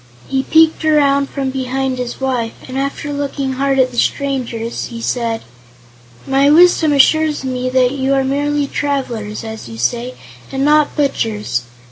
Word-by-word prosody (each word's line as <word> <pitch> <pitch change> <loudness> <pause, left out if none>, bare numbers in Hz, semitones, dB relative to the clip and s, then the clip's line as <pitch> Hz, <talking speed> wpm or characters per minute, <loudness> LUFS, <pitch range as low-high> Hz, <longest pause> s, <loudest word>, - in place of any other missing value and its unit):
He 265 0 0
peeked 320 +3 +3
around 280 -3 +3
from 270 -2 -3
behind 260 0 -2
his 245 -1 -4
wife 250 -4 -1
and 260 - -7
after 275 +2 -3
looking 280 -1 -2
hard 270 +1 0
at 255 -1 +3
the 240 - -2
strangers, 245 -5 -2
he 235 -1 -7
said: 230 -1 -2 0.8
"My 275 +1 +3
wisdom 325 0 +5
assures 300 +1 +3
me 255 -1 -2
that 255 -1 +3
you 275 0 0
are 270 - +2
merely 290 +2 0
travelers, 250 -8 -3
as 220 - -7
you 115 - -9
say, 120 +2 -1 0.4
and 270 +1 -1
not 300 0 +3
butchers. 220 - -1
270 Hz, 155 wpm, -17 LUFS, 245-285 Hz, 0.8 s, wisdom